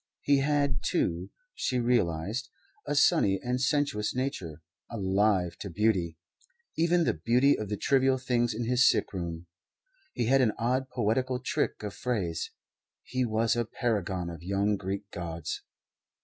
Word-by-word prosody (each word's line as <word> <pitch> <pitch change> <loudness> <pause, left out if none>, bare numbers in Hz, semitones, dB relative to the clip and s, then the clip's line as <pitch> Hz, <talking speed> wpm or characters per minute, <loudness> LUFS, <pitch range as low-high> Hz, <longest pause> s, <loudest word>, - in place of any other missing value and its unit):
He 140 -1 +4
had, 140 -1 +1
too, 90 - -1 0.2
she 130 - -1
realized, 115 -1 0 0.4
a - - 0
sunny 95 -8 +4
and 125 +1 -1
sensuous 135 -7 0
nature, 95 - -3 0.3
alive 95 -3 +1
to 100 - -6
beauty 90 -4 +1 0.6
even 170 +1 +3
the - - +2
beauty 120 - +3
of 105 -2 -5
the 105 - -2
trivial 135 +1 +3
things 120 -3 0
in 120 +1 -2
his 125 +2 +5
sickroom. 85 -2 -2 0.7
He - - -1
had 135 +3 +4
an 110 -4 +3
odd, 130 +3 0
poetical 125 +3 0
trick 125 -3 -2
of 105 -2 -4
phrase. 100 -10 -2 0.5
He 130 -1 -1
was 115 0 +1
a 120 - +1
paragon 95 -7 -2
of 85 - -9
young 100 +3 +1
Greek 95 +1 -4
gods. 85 -2 -5
115 Hz, 145 wpm, -29 LUFS, 95-130 Hz, 0.7 s, his